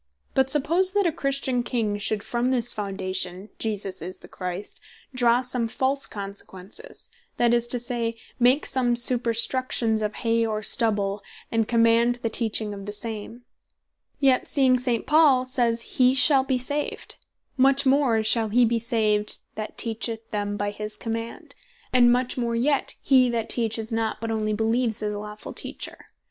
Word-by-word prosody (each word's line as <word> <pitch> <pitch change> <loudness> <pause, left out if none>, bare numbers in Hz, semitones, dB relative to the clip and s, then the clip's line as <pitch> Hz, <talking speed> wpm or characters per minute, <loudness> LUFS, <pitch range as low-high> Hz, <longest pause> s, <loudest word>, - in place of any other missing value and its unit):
But 265 0 +2
suppose 330 +7 +4
that 405 -1 +2
a 340 - +2
Christian 275 -3 -1
King 225 -4 -2
should 205 0 -1
from 240 +3 -1
this 245 -2 +1
Foundation, 190 -2 -3
Jesus 205 -3 -2
Is 185 - -7
The - - -15
Christ, 180 +2 -7 0.3
draw 245 -1 +3
some 250 -2 -1
false 265 +4 0
consequences, 200 - -6 0.3
that 240 -1 +3
is 240 0 +2
to 245 - +3
say, 235 -1 -2 0.2
make 250 +4 +3
some 245 -2 0
superstructions 235 -1 +1
of 210 0 -2
Hay, 230 0 0
or 215 -1 -2
Stubble, 205 -4 +1 0.3
and 225 -1 +1
command 230 +1 +3
the 230 - -1
teaching 220 -2 0
of 200 0 -9
the - - -3
same; 225 +2 -6 0.7
yet 265 -3 +2
seeing 260 -3 +3
St. 245 -2 -1
Paul 295 -5 +4
says, 240 -3 0 0.2
he 255 +1 +5
shal 270 +1 +5
be 265 -1 0
saved; 285 +4 -3 0.4
much 275 +1 +3
more 260 -5 +3
shall 220 0 +2
he 240 +3 +4
be 230 0 0
saved, 215 -3 +1 0.2
that 215 0 -7
teacheth 225 0 -1
them 205 -1 -2
by 205 0 -2
his 210 0 -7
command; 230 +1 -6 0.4
and 240 -1 +6
much 250 +1 0
more 235 -1 -1
yet, 275 +4 0
he 255 -2 +4
that 230 -2 -2
teaches 225 -1 -2
not, 225 -1 -1
but 225 0 -4
onely 215 -1 -1
beleeves 225 +1 0
his 210 0 -2
lawfull 210 +1 -8
Teacher. - - -7
230 Hz, 160 wpm, -24 LUFS, 215-255 Hz, 0.7 s, and